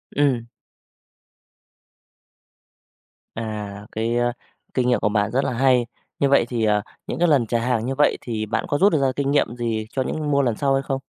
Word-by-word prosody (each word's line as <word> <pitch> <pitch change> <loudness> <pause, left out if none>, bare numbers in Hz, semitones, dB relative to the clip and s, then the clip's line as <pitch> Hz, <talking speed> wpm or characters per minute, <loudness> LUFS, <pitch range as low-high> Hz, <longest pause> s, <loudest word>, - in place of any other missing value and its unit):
Ừm. 135 -5 +2 2.9
À, 105 -2 -5
cái 115 +2 -1 0.6
kinh 125 -1 +1
nghiệm 125 - +3
của 105 - +1
bạn 105 0 0
rất 130 +3 +1
là - - -1
hay. 125 -1 +3 0.3
Như 140 - +3
vậy 135 -4 +4
thì, 115 -3 0
à, 105 -1 +2 0.3
những - - -4
cái 175 - +4
lần 135 -8 +3
trả 120 +1 +1
hàng 120 -1 0
như 135 +1 -2
vậy, 150 - +3
thì 110 -3 -3
bạn 110 - -2
có 145 - 0
rút 195 +3 +4
ra 135 -4 +2
kinh 140 0 0
nghiệm 140 -4 +1
gì 115 -3 -2
cho 130 - -2
những 150 +3 -2
mua 140 0 +3
lần 120 -5 0
sau 140 -1 +1
hay 135 - +2
không? 135 -1 -2
125 Hz, 195 wpm, -22 LUFS, 110-140 Hz, 2.9 s, vậy